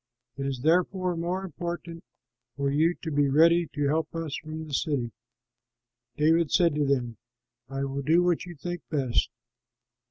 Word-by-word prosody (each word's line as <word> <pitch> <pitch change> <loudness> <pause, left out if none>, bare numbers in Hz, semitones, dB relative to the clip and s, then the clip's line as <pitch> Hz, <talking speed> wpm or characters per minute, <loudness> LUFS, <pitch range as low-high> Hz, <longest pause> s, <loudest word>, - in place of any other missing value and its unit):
It 135 0 -3
is 130 -2 -4
therefore 180 +2 +2
more 175 +3 -2
important 170 0 -6 0.5
for 140 -1 0
you 160 +5 +3
to 160 - -3
be 145 -1 +2
ready 165 +4 +5
to 145 -1 +1
help 155 +2 -1
us 165 -3 -3
from 155 +1 -7
the 150 - -9
city." 130 -5 0 1.1
David 160 +1 +3
said 170 -4 +3
to 150 0 +1
them, 120 -5 0 0.5
"I 135 0 -3
will 140 0 -3
do 165 +6 +4
what 175 +1 +1
you 175 -1 -9
think 175 +3 -5
best!" 135 -6 +1
155 Hz, 160 wpm, -27 LUFS, 140-170 Hz, 1.1 s, ready